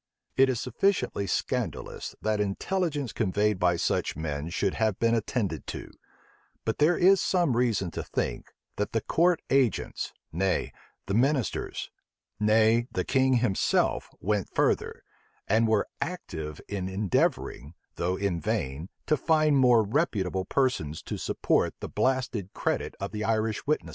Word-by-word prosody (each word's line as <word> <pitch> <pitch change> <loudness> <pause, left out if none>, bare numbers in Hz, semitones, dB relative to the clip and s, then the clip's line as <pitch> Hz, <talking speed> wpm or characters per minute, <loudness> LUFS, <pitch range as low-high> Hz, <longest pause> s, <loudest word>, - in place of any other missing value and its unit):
It 135 0 +5
is 125 -3 0
sufficiently 125 - 0
scandalous, - - -3
that 110 -1 +1
intelligence 145 - -1
conveyed 105 -1 +1
by 90 -1 +3
such 85 - 0
men 75 0 -3
should 95 +2 0
have 110 -3 0
been 115 0 +2
attended 115 -1 -1
to; - - -6 0.7
but 110 - -1
there 160 +4 +4
is 190 +2 +5
some 175 -9 +2
reason 110 -7 +1
to - - -4
think, - - -3 0.3
that 105 - -2
the 115 - +1
court 170 +6 +2
agents, 135 -4 +1 0.2
nay, 95 +3 0 0.3
the 100 - -3
ministers, 130 +1 0 0.5
nay, 110 +2 +4
the 90 - -1
king 130 0 +3
himself,[*] 120 -6 +1
went 105 -1 -1
further, - - +1 0.4
and 110 +3 +3
were 110 -2 +2
active 80 - -5
in 95 -2 -3
endeavoring, 95 - -1 0.2
though 90 +2 0
in 95 -3 -1
vain, 70 +5 -2 0.2
to 155 - +3
find 155 0 +3
more 125 -4 +5
reputable 100 - 0
persons 90 - 0
to - - -4
support - - 0
the - - -5
blasted 125 -7 -1
credit - - -2
of - - -4
the 105 0 -3
Irish 110 +2 0
witnesses. 150 - 0
110 Hz, 145 wpm, -28 LUFS, 95-130 Hz, 0.7 s, It